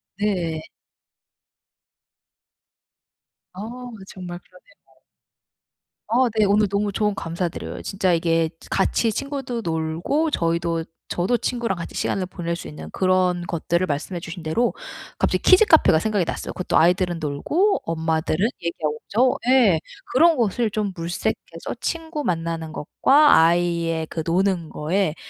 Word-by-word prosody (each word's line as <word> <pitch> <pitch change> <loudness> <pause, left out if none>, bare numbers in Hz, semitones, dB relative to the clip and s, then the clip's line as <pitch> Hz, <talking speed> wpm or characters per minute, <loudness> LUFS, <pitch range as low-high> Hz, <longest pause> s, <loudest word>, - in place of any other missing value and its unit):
네. 180 -6 -1 2.9
어 185 - -10 0.5
정말 175 -2 -8
그러네요. - - -24 1.1
아 245 +2 +3
네 210 - +5
오늘 205 +1 +3
너무 205 +1 0
조언 210 -1 +1
감사드려요. 170 -1 -4
치 195 - -7 0.2
이게 165 -1 +1 0.2
같이 225 -2 +2
친구도 270 -2 -4
놀고 165 - -1
저희도 165 -2 0 0.2
저도 210 +8 +1
친구랑 235 -7 -2
같이 170 - -7
시간을 190 - -1
보낼 170 -2 -4
수 - - -8
있는 80 0 -9
그런 185 -1 +2
것들을 170 +2 0
말씀해 155 +5 -3
주신 170 0 -8
대로 195 +10 +1 0.4
갑자기 - - +1
키즈 375 +3 +6
카페가 310 - +5
생각이 205 -2 0
났어요. - - -4
그것도 180 - 0
아이들은 175 0 +3
놀고 300 - +1
엄마들은 160 +3 0 0.2
얘기하고 155 -3 -2
그죠? 250 +5 +1
예. 235 -11 +5 0.3
그런 325 +6 +5
것을 230 -1 +1
좀 210 -1 -2
물색해서 170 +1 -4
친구 320 -2 -3
만나는 165 -2 -2
것과 290 - +4
아이의 165 -1 +2
그 160 - -4
노는 180 -1 +1
거에 165 +2 -1
180 Hz, 280 characters per minute, -23 LUFS, 165-220 Hz, 2.9 s, 키즈